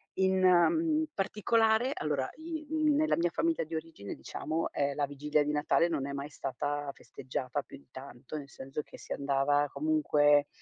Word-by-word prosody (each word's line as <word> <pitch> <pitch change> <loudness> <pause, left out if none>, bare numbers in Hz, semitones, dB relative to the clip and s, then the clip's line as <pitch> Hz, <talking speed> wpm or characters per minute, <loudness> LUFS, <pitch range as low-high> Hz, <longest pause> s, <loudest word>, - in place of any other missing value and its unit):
In, 190 0 +2
ehm, 310 - +4
particolare 220 +4 +2
allora, 140 -3 -1
i 315 -1 -6
mhmm, 310 -2 +2
nella 310 +1 +3
mia 175 +1 +2
famiglia 330 - 0
di 160 +1 -6
origine, 160 -11 -6
diciamo, 160 +2 -3
ehm, 140 0 0
la 145 -1 +1
vigilia 150 +1 0
di 145 - -1
Natale 150 +3 +2
non 145 -5 -1
è - - -4
mai 140 +1 -4
stata 145 +1 -3
festeggiata 130 +1 -4
più - - -12
di 140 - -22
tanto, 130 +2 -8
nel 140 -2 -8
senso 135 +2 -6
che - - -13
si - - -6
andava, 140 +1 +1
comunque 150 - +3
150 Hz, 175 wpm, -31 LUFS, 140-220 Hz, -, ehm